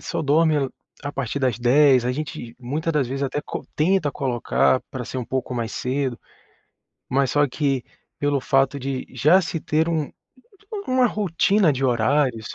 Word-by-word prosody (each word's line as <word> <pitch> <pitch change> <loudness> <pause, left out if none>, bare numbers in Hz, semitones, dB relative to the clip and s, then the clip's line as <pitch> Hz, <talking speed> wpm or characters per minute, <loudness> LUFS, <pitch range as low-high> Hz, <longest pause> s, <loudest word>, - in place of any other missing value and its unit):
só - - -3
dormem 150 -1 +3 0.3
a 145 0 -4
partir 135 0 -3
das 130 -5 0
22:00, 130 +1 +5
a 125 - +1
gente 125 -5 -6
muitas 150 +6 -2
das 145 -4 +1
vezes, 135 +2 -4
até 140 +2 -1
co - - -6
tenta 160 -1 +2
colocar 130 0 +1
pra 125 -2 -5
ser 130 - -5
um 125 - -3
pouco 130 0 -3
mais 115 -2 -2
cedo, 130 -1 -2 0.9
mas 135 0 +1
só 145 0 +3
que 135 -2 -1 0.3
pelo 145 -1 +1
fato 135 +1 +2
de 135 -1 -4
já 150 +9 +4
se 165 -2 -4
ter 160 +3 0
um 155 -3 -1 0.8
uma 255 -1 +4
rotina 200 -3 +2
de 135 0 -2
horários, 125 -1 +1
140 Hz, 165 wpm, -23 LUFS, 125-150 Hz, 0.9 s, 22:00